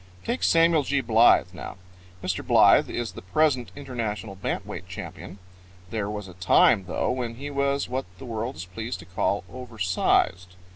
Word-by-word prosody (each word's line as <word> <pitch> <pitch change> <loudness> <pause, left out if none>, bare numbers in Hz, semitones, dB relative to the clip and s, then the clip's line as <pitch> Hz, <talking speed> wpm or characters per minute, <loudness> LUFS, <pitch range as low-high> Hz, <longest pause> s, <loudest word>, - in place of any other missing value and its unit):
Take 240 - -2
Samuel 165 -1 +4
G. 140 0 0
Blythe 115 -7 +4
now. 90 - -8 0.5
Mr. 90 -1 -2
Blythe - - +5
is 120 -4 -3
the 95 - -10
present 125 - +1
international 115 -7 -4
bant 95 - -3
weight - - -8
champion. - - -8 0.5
There 105 -3 -2
was 105 -2 -5
a 90 - -11
time, 90 +1 +4
though, 95 - -1
when 120 -2 -3
he 140 +4 -6
was 140 0 0
what 130 +2 -3
the 100 - -10
world 115 -2 -4
is 85 +3 -7
pleased 110 +6 -5
to - - -13
call 95 +2 -1
over 125 -3 -9
sized. 90 -1 +1
115 Hz, 175 wpm, -25 LUFS, 95-130 Hz, 0.5 s, Blythe